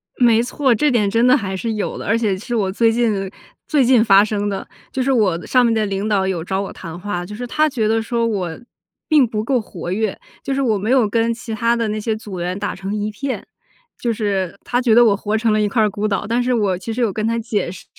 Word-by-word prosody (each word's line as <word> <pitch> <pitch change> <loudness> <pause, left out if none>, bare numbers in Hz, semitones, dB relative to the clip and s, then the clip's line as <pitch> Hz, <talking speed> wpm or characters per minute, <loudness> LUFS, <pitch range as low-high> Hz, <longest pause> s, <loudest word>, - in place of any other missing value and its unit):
没 235 -2 +4
错， 255 +2 +1
这 295 +7 +2
点 225 -6 +2
真 230 +4 +2
的 255 - +6
还 195 -6 -4
是 225 +4 -2
有 210 -2 -3
的， - - -7
而 225 +3 +3
且 215 -4 0
其 185 - -10
实 240 - -2
我 195 -4 0
最 225 +3 +3
近 220 -5 0 0.4
最 295 -4 +3
近 245 -2 +5
发 200 -2 +6
生 205 -1 -1
的。 195 - -4 0.2
就 260 - -1
是 270 - +1
我 195 -9 +1
上 250 -1 +3
面 230 - +2
的 220 -1 +1
领 200 +1 -2
导 200 -3 +1
有 180 -4 -2
找 190 +2 -2
我 200 - -6
谈 165 0 -8
话， 180 -2 -4
就 210 +3 -8
是 245 +3 -5
他 305 +5 +2
觉 225 -6 -1
得 225 +1 +2
说 230 +1 -1
我 185 -7 -2 0.5
并 300 -6 +4
不 215 -1 -3
够 255 +2 +1
活 175 -4 -7
跃， 215 +1 -1 0.3
就 275 - -2
是 275 - 0
我 225 -6 +1
没 205 +3 -3
有 255 -4 +4
跟 230 +2 +1
其 225 0 -7
他 230 +1 +1
的 230 -1 -1
那 215 +1 -2
些 220 +1 -1
组 205 -4 -7
员 180 +2 -2
打 205 0 -3
成 195 +2 -5
一 210 0 -2
片， 265 +5 -4 0.6
就 240 - 0
是 200 -4 -2
他 245 0 0
觉 235 -3 +3
得 240 0 +7
我 210 -3 +4
活 210 +1 -1
成 220 -1 +1
了 215 - +2
一 210 - +2
块 220 +2 +2
儿 - - +4
孤 205 +1 -2
岛。 205 0 -1
但 235 +2 +1
是 250 +1 0
我 205 -5 +1
其 190 +5 -6
实 235 +3 -2
有 225 -5 +1
跟 215 +2 -1
他 230 0 0
解 220 -5 -2
释， 185 - -11
220 Hz, 295 characters per minute, -19 LUFS, 200-235 Hz, 0.6 s, 得